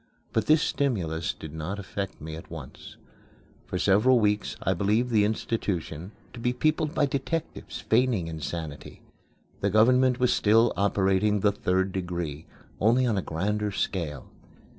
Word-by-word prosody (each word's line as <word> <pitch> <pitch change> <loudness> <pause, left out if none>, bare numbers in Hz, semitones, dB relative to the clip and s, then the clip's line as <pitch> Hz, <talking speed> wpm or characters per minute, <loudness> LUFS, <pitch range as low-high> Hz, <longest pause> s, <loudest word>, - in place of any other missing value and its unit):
But - - 0
this 155 0 +5
stimulus 85 - -1
did 80 -1 -10
not 80 +6 -4
affect 100 -1 -5
me 80 +1 -7
at 80 - -10
once. - - -10 0.7
For - - -3
several 110 +6 +4
weeks 105 -1 0
I 95 - +2
believed 105 +7 +1
the 105 -2 +4
institution 100 -5 -2 0.2
to 120 - -9
be 125 +1 0
peopled 155 +3 0
by 145 - +3
detectives, 140 +4 -4
feigning 115 -5 +2
insanity. 80 -2 -6 0.6
The 100 - +1
government 125 +5 +4
was 125 -1 +3
still 115 +2 +4
operating 100 +1 +2
the 105 - +4
Third 95 -1 0
Degree, 85 -5 -4 0.3
only 120 +5 +3
on 115 -3 +1
a 95 - 0
grander 105 +6 -2
scale. 80 -8 -3
100 Hz, 145 wpm, -27 LUFS, 85-120 Hz, 0.7 s, this